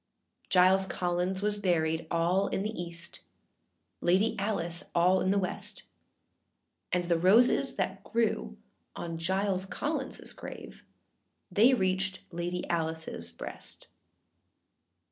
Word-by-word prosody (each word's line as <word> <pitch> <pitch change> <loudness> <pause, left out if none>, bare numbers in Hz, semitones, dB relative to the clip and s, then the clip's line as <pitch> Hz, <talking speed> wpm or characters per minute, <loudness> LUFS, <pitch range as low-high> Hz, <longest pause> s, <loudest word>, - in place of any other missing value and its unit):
â - - -40
Giles 190 +1 +5
Collins 180 +2 -1
was 210 0 +1
buried 160 -4 +1
all 175 +4 +2
in 195 - -2
the 215 - -2
east, 170 -3 -5 0.8
Lady 190 +6 +3
Alice 175 -5 -1
all 180 +2 +4
in 185 - +1
the 200 - +3
west; 185 -2 -2 1.1
And 180 0 +1
the 170 -1 +1
roses 210 +8 +5
that - - -2
grew 220 - -1 0.4
on 165 -1 -5
Giles 190 +2 0
Collinsâs 280 +4 -3
grave, - - -9 0.7
They 235 +5 +5
reached 190 -2 -1
Lady 175 +1 -3
Aliceâs 160 - -2
breast. - - -9
185 Hz, 115 wpm, -30 LUFS, 170-195 Hz, 1.1 s, Giles